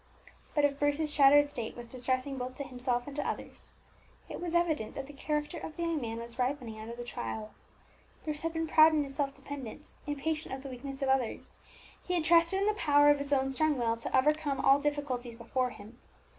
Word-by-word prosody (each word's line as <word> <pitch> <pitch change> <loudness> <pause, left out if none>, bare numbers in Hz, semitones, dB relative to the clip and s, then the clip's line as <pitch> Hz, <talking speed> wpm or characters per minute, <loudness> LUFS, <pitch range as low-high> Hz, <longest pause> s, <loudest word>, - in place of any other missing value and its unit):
But 295 -1 +4
if 280 -1 0
Bruce's 295 +1 +1
shattered 290 0 +7
state 240 -6 -5
was 240 -1 -7
distressing 255 +2 -2
both 250 +1 -4
to 280 - -4
himself 245 -2 -2
and 285 - -8
to 290 - -1
others, - - -7 0.5
it - - -6
was 345 -1 -2
evident 315 -10 +1
that 275 - -4
the 290 - -11
character 300 +3 -2
of 310 - -7
the 340 - -2
young 335 -3 0
man 225 -1 -4
was 235 +1 -8
ripening 250 -4 -2
under 225 +2 -7
the 240 - -6
trial. 220 -3 -5 0.7
Bruce 300 -1 -3
had 330 - -1
been 325 0 -1
proud 315 0 +6
in 300 - +2
his 275 -1 -7
self 280 -1 -1
dependence, 275 0 -8
impatient 300 0 -2
of 265 - -10
the 275 - -6
weakness 270 +2 -6
of 270 - +1
others; 265 -4 -1 0.5
he 360 - -1
had 340 - +1
trusted 335 +3 +4
in 400 - +1
the 425 - +3
power 290 -7 +5
of 290 - +2
his 280 0 -4
own 270 -1 +2
strong 305 +2 +1
will 230 -2 +1
to 230 - 0
overcome 295 0 +2
all 275 +1 +5
difficulties 275 -5 -2
before 250 +2 -1
him. 225 0 -13
280 Hz, 215 wpm, -31 LUFS, 250-300 Hz, 0.7 s, shattered